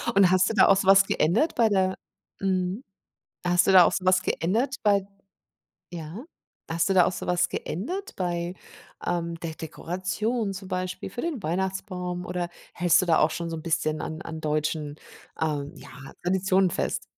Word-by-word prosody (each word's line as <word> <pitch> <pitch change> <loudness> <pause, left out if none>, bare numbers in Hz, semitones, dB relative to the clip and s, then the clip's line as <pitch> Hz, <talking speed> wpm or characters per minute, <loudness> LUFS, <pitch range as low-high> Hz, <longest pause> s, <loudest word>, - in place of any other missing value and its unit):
Und 190 -2 +6
hast 185 0 +4
du - - -1
da - - +6
auch 195 - +5
so 190 - -1
was 195 0 +7
geändert 200 - +1
bei 230 -2 +4
der 190 -2 +1 0.5
Mhm. 185 +4 0 0.6
Hast 180 +1 +3
du - - +5
da 185 - +10
auch - - +3
so 185 - -3
was 185 0 +4
geändert 230 - 0
bei 200 -2 +3 0.9
Ja. 170 - -7 0.5
Hast 165 +4 +1
du 195 - +3
da 180 -2 +6
auch - - 0
so - - -6
was 180 0 +2
geändert 365 - -4
bei, 175 -1 -2 0.5
ähm, 170 -1 -2
der 160 -2 -5
Dekoration 195 +7 -3
zum 190 0 -8
Beispiel 185 -1 -3
für 240 - -6
den 310 - -3
Weihnachtsbaum 180 +1 -3
oder 175 -1 -3 0.2
hältst 175 +1 +4
du 185 - -2
da 165 - +4
auch - - +4
schon 170 -1 -4
so 165 - -4
'n 155 - -7
bisschen 155 -2 -1
an 160 0 -5
an 160 - -7
deutschen, 150 -1 -1 0.4
ähm, 150 -3 -1
ja, - - -12 0.3
Traditionen 190 0 +2
fest? - - -2
180 Hz, 180 wpm, -26 LUFS, 170-195 Hz, 0.9 s, da